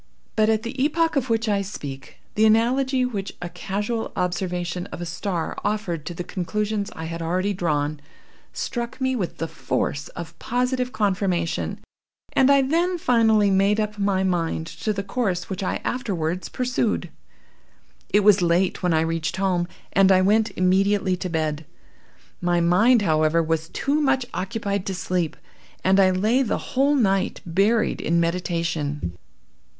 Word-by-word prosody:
But 215 0 +3
at 220 0 +2
the 255 +3 -2
epoch 325 +2 +1
of 260 -2 0
which 225 0 +1
I 205 -2 +2
speak, 145 -9 -7 0.2
the 220 +1 +4
analogy 255 +4 +3
which 205 -6 -4
a 175 - -5
casual 205 +6 -3
observation 180 0 -2
of - - -8
a 175 - -4
star 175 0 -3
offered 200 -7 -2
to 175 - -5
the 175 - -4
conclusions 205 +3 -2
I 160 - -6
had 165 +1 -5
already 185 +5 0
drawn, 150 -4 -1 0.5
struck 235 -1 -4
me 260 0 0
with 190 -8 -3
the 165 - -2
force 145 -3 -2
of 170 -1 -8
positive 250 +1 -1
conformation, 185 -6 0 0.6
and 265 0 +4
I 280 -1 +5
then 340 +6 +1
finally 220 -8 +3
made 195 +2 +3
up 210 -1 -2
my 195 -1 +1
mind 170 -3 0
to 165 +5 -3
the 200 -1 -3
course 195 -5 -2
which 190 - -3
I 185 - -1
afterwards 185 -8 -2
pursued. 240 -8 -1 1.0
"It 205 - +4
was 205 -1 +5
late 175 +2 +2
when 180 -3 +2
I 160 - +3
reached 165 0 -1
home, 185 -3 +1 0.3
and 195 +1 +5
I 185 0 +5
went 215 +3 +3
immediately 190 +1 +2
to 185 0 -4
bed. 155 -2 -1 0.8
My 175 -1 +2
mind, 210 +8 +4
however, 155 -1 +3
was 160 0 -1
too 290 +2 0
much 270 -3 +2
occupied 200 +2 -2
to 190 - -2
sleep, 180 -3 -2 0.5
and 190 +1 +4
I 190 -1 +6
lay 215 +8 +2
the 250 - 0 0.2
whole 275 +3 +3
night 195 -7 +1
buried 200 +6 +1
in 170 +2 +1
meditation. 165 - -1
195 Hz, 160 wpm, -23 LUFS, 170-220 Hz, 1.0 s, I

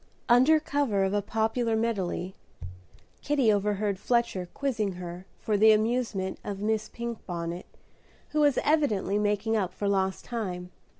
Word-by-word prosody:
Under 260 +7 +6
cover 280 -10 0
of 190 +1 0
a 205 - +2
popular 225 +2 0
medley, 190 -5 -1 0.9
Kitty 275 -7 +3
overheard 205 -1 0
Fletcher 235 -7 0
quizzing 225 -8 -1
her 180 +1 -8
for 210 -2 -1
the 220 +1 +7
amusement 215 -3 -1
of 200 -1 -5
Miss 215 +1 -1
Pinkbonnet, 180 -7 -5 0.6
who 305 - -1
was 290 -3 +4
evidently 220 -10 +1
making 210 +2 0
up 190 -4 0
for 200 +2 -3
lost 190 -1 0
time. 180 -6 -4
210 Hz, 135 wpm, -28 LUFS, 190-235 Hz, 0.9 s, the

